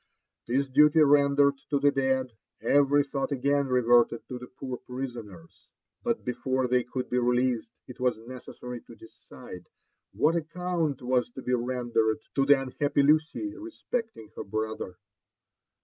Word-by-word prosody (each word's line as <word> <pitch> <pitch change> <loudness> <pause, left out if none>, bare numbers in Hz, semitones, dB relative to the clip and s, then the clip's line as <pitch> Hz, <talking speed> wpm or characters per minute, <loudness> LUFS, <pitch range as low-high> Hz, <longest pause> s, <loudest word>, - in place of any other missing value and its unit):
This 135 +4 +1
duty 150 +4 +5
rendered 140 -1 +4
to 145 - +1
the 145 0 +4
dead, 130 -2 0 0.3
every 145 0 +3
thought 140 0 -3
again 140 +1 +1
reverted 120 -2 +3
to 125 - -5
the 125 - -9
poor 130 0 -7
prisoners. 120 -11 -8 0.3
But - - -2
before 130 +1 -1
they 125 0 +2
could 125 +1 -5
be 125 - +2
released, 125 -1 +1 0.2
it 125 - -11
was 125 -2 +1
necessary 125 +1 -9
to 115 - -15
decide 110 -4 -13 0.4
what 160 +3 +2
account 165 -4 -2
was 125 -1 +1
to 130 - -8
be 125 - -1
rendered 120 -3 0 0.2
to 135 -1 +1
the 145 -1 +6
unhappy 140 +2 0
Lucy 155 - +1
re 330 +1 -8
specting 230 - -5
her - - -5
brother. 110 -3 -4
130 Hz, 150 wpm, -27 LUFS, 120-145 Hz, 0.4 s, the